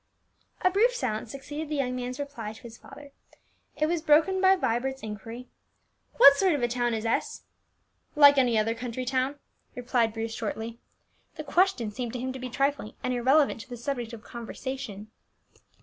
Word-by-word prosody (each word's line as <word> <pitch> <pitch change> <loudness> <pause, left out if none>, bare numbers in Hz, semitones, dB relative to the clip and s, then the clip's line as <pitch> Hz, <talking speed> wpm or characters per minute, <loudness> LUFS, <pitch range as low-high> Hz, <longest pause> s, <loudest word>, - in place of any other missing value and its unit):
A 370 - +4
brief 465 +6 +3
silence 220 - -3
succeeded 290 +3 -6
the 305 - -2
young 255 -3 -1
man's 250 +1 -5
reply 240 -7 -5
to 220 - -15
his 235 -1 -10
father; 285 +3 -13 0.7
it 305 - +2
was 335 +1 0
broken 325 +5 +3
by 380 0 +6
Vibert's 265 -3 -2
inquiry, 225 +4 -7 0.7
"What 280 0 +9
sort 370 -2 +3
of 270 - -2
a - - +3
town 240 -1 0
is 220 0 -4
S 225 - -1 0.3
?" - - -44
"Like 285 -1 +8
any 245 -3 +3
other 220 +1 +1
county 245 +1 -5
town," 260 +2 -1 0.4
replied 240 -2 +1
Bruce 225 0 -4
shortly. 225 +1 -5 0.6
The 310 - -6
question 305 - +1
seemed 240 +1 -5
to 250 - -4
him 260 +1 -3
to 265 - -7
be 255 0 -5
trifling, 275 -3 -1
and 255 - 0
irrelevant 260 +1 +3
to 255 - -14
the 245 - -7
subject 240 -1 -4
of 225 -2 -10
conversation. 235 -3 -7
255 Hz, 180 wpm, -27 LUFS, 230-285 Hz, 0.7 s, What